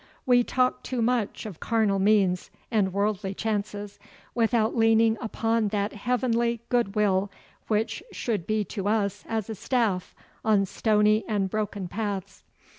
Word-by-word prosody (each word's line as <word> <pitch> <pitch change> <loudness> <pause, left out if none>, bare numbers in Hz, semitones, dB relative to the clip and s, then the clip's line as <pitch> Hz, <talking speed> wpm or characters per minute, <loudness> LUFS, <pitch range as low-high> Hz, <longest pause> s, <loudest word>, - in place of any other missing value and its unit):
'We 245 -2 +4
talk 255 0 +1
too 255 - -4
much 230 -3 0
o' 210 - -5
carnal 215 -4 +1
means 195 -3 +2 0.2
and 205 -4 +2
worldly 200 0 -1
chances, 205 -1 -3 0.3
without 230 -1 +2
leaning 225 -1 +4
upon 225 -1 0
that 205 0 -1
heavenly 235 +1 0
goodwill 205 -4 +1 0.4
which 220 +1 0
should 215 - -3
be 215 -1 +1
to 200 0 -4
us 205 -2 0
as 220 -3 -2
a 225 - -4
staff 215 -4 -1 0.3
on 210 -3 +3
stony 215 +2 +2
and 200 -3 0
broken 205 -3 -2
paths. 200 -1 -4
215 Hz, 135 wpm, -26 LUFS, 200-225 Hz, 0.4 s, We